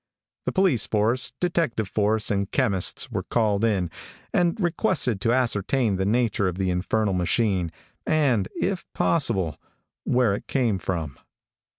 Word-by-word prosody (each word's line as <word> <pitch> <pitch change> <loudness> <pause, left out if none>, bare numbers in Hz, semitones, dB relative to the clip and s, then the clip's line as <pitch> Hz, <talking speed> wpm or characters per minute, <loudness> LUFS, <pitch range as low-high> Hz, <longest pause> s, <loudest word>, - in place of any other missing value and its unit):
The - - 0
police 180 - +2
force, 115 +4 +1
detective 165 - 0
force 105 +2 0
and 100 -1 0
chemists 100 -9 0
were - - -1
called 110 -3 0
in, 95 -7 +1 0.4
and 175 +4 +2
requested 170 - 0
to 115 - +2
ascertain 120 -2 +1
the 95 +1 0
nature 110 -3 +1
of 90 -1 -3
the 95 -1 0
infernal 100 +3 0
machine, 90 -1 +1 0.3
and, 130 -11 +2
if 190 -2 -1
possible, 95 - 0 0.4
where 125 -5 +2
it 100 - -5
came 115 -8 +1
from. 80 -8 -4
110 Hz, 135 wpm, -25 LUFS, 95-130 Hz, 0.4 s, police